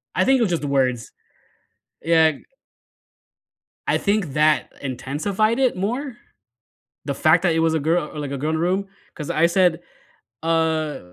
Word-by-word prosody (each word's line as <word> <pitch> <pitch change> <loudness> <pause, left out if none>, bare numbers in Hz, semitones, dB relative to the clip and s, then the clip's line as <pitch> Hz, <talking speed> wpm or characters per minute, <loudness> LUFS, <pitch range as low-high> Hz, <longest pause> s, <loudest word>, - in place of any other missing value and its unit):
I - - +2
think 265 -1 +4
it - - 0
was 200 -6 +1
just 165 - -1
the 145 - -3
words. 130 -4 0 0.9
Yeah 160 -2 +4 1.5
I - - +2
think 200 -8 -1
that 155 0 +2
intensified 185 - -1
it 255 -6 +2
more, 240 +7 -3 0.9
the 140 - -2
fact 160 +5 +3
that 175 -3 +2
it 165 - +1
was 160 0 +2
a - - +1
gir 160 +4 +1
or, 150 0 -8
like, 140 -2 -5
a 140 - -3
girl 150 +4 -2
in 160 - 0
the 160 - -2
room. 190 +3 0 0.3
'Cause 150 -3 -7
I 160 +2 +3
said, 175 -1 +2 0.6
uh 160 -2 0
160 Hz, 175 wpm, -22 LUFS, 150-190 Hz, 1.5 s, think